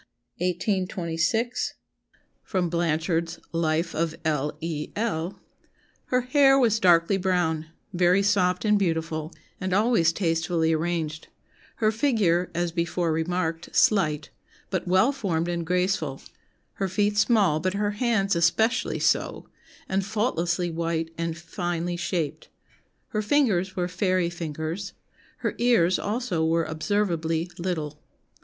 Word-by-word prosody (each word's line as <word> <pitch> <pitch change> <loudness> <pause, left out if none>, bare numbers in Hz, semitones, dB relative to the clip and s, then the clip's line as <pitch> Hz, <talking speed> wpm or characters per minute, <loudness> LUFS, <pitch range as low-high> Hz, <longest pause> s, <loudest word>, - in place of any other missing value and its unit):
1826. 185 +4 -1 0.7
[Sidenote: 180 -4 -1
Blanchard's 165 0 0
Life 165 0 0
of 165 0 -1
L. 150 -2 0
E. 155 -2 -4
L.] 195 -5 -2 0.7
"Her 250 0 +1
hair 270 +1 +5
was 225 -4 +3
'darkly 175 0 +4
brown,' 175 -4 0 0.3
very 180 +2 +3
soft 195 -1 +2
and 210 -1 +4
beautiful, 160 -3 -1 0.3
and 185 0 -2
always 210 -6 +3
tastefully 165 -2 +1
arranged; 160 -1 -2 0.5
her 215 -1 +2
figure, 210 -8 +2
as 175 0 0
before 170 0 -1
remarked, 165 0 -2
slight, 155 -8 +2 0.4
but 185 -1 -2
well 190 +9 +4
formed 175 - -1
and 170 -1 -2
graceful; 180 -6 0 0.6
her 195 - +2
feet 205 +2 +1
small, 205 -7 +3
but 185 +3 -1
her 205 0 0
hands 205 -3 +1
especially 175 +8 +2
so, - - 0 0.4
and 195 +1 0
faultlessly 180 -5 -1
white 165 0 -2
and 165 0 -3
finely 175 0 -3
shaped; 170 -3 -3 0.6
her 215 - -1
fingers 205 -7 +1
were 180 -2 0
fairy 180 -1 0
fingers; 165 +3 -5 0.4
her - - -2
ears 225 -8 +3
also 210 -7 -1
were 165 0 +2
observably 165 -1 -1
little. 155 -4 -3
175 Hz, 120 wpm, -26 LUFS, 165-200 Hz, 0.7 s, hair